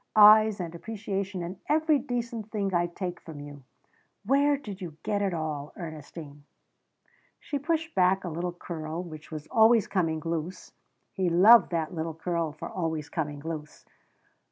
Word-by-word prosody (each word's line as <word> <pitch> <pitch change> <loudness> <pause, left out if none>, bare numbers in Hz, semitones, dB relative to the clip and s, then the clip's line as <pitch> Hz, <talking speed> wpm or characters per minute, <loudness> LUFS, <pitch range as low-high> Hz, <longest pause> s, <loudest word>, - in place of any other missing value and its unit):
Eyes 215 0 +8
and 170 -2 -4
appreciation 195 -1 -4
and 180 +2 -6
every 310 -1 +3
decent 235 -4 -4
thing 200 -3 -2
I 175 0 +2
take 175 0 -5
from 160 -3 -10
you. 145 -1 -10 0.6
Where 285 +1 +3
did 205 -8 -9
you 165 -4 -7
get 205 -1 0
it 200 -1 +1
all, 155 -3 -4
Ernestine?" 155 -3 -9 1.0
She 285 - -4
pushed 325 +2 -1
back 185 +1 +3
a 180 - -3
little 170 +2 -3
curl 170 -1 -5
which 155 -3 -10
was 155 -2 -6
always 225 0 +5
coming 165 -5 0
loose, 165 +2 -4 0.4
he 185 -3 0
loved 205 +8 +7
that 165 -2 -2
little 160 -1 -3
curl 165 -1 -2
for 150 - -7
always 160 -4 -3
coming 145 -3 -3
loose. 155 -1 -7
175 Hz, 155 wpm, -28 LUFS, 160-215 Hz, 1.0 s, Eyes